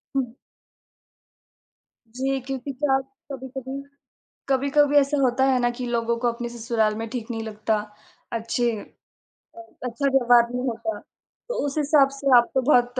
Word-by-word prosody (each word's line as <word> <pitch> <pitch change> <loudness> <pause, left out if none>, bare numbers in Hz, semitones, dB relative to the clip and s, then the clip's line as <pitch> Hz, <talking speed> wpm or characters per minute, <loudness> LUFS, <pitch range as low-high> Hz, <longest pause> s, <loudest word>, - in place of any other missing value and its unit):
हुँ। 250 -4 -1 1.7
जी, 265 +4 -2
क्योंकि 270 +1 -5
क्या 275 +1 0
होता 270 +1 -4
है - - -4
कभी-कभी 265 +1 -6 0.7
कभी-कभी 280 +2 +3
ऐसा 285 +1 +3
होता 260 0 +2
है 265 -1 +3
ना 240 0 +2
कि 250 - -2
लोगों 235 -1 0
को 245 - +1
अपने 240 +1 -5
ससुराल 230 -2 0
में 225 +1 -4
ठीक 240 -1 -5
नहीं 225 -1 -3
लगता, 215 0 -1 0.5
अच्छे 230 +1 0 0.8
अ, 230 - -9 0.2
अच्छा 250 +3 -1
व्यवहार 245 -3 +5
नहीं 250 +1 -2
होता। 250 +8 -3
तो - - -7
उस 285 +1 -3
हिसाब 290 -2 +4
से 275 -2 +4
आप 240 0 +3
तो 265 - +4
बहुत 245 0 +3
255 Hz, 155 wpm, -24 LUFS, 235-270 Hz, 1.7 s, व्यवहार